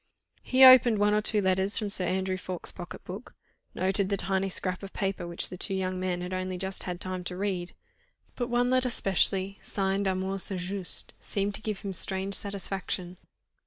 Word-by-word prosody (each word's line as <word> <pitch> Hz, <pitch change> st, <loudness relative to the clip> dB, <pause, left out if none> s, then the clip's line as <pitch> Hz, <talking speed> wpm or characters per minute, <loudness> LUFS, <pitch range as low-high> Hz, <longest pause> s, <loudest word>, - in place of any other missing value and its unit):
He 260 Hz, +1 st, +4 dB
opened 255 Hz, -3 st, +9 dB
one 205 Hz, 0 st, +3 dB
or 210 Hz, -, +3 dB
two 210 Hz, -1 st, +1 dB
more 190 Hz, -, +3 dB
letters 190 Hz, +2 st, +1 dB
from 210 Hz, -2 st, -1 dB
Sir 185 Hz, -, +2 dB
Andrew 190 Hz, +1 st, -1 dB
Ffoulkes' 185 Hz, -1 st, -4 dB
pocket -, -, -9 dB
book, -, -, -9 dB, 0.4 s
noted 190 Hz, +1 st, +1 dB
the 200 Hz, -, 0 dB
tiny 195 Hz, +1 st, 0 dB
scrap 185 Hz, 0 st, -2 dB
of 195 Hz, -1 st, -9 dB
paper 195 Hz, -3 st, -2 dB
which 170 Hz, -, -1 dB
the 180 Hz, -, -8 dB
two 195 Hz, -, -1 dB
young 185 Hz, -1 st, -2 dB
men 180 Hz, -1 st, -2 dB
had 180 Hz, +1 st, -5 dB
only 185 Hz, 0 st, -3 dB
just 190 Hz, +1 st, -3 dB
had 180 Hz, -1 st, -4 dB
time 185 Hz, -1 st, -4 dB
to 180 Hz, 0 st, -5 dB
read; 185 Hz, -3 st, -2 dB, 0.6 s
but 245 Hz, -1 st, -3 dB
one 245 Hz, +1 st, +2 dB
letter 255 Hz, 0 st, +3 dB
specially, 195 Hz, -2 st, +3 dB
signed 195 Hz, 0 st, -1 dB
Armand 190 Hz, +1 st, -1 dB
St. 190 Hz, -1 st, 0 dB
Just, 185 Hz, +1 st, -5 dB
seemed 200 Hz, 0 st, -1 dB
to 215 Hz, -, -6 dB
give 215 Hz, -3 st, -4 dB
him 195 Hz, -1 st, -4 dB
strange 190 Hz, +2 st, -1 dB
satisfaction. 190 Hz, -2 st, -3 dB
190 Hz, 200 wpm, -28 LUFS, 185-200 Hz, 0.6 s, opened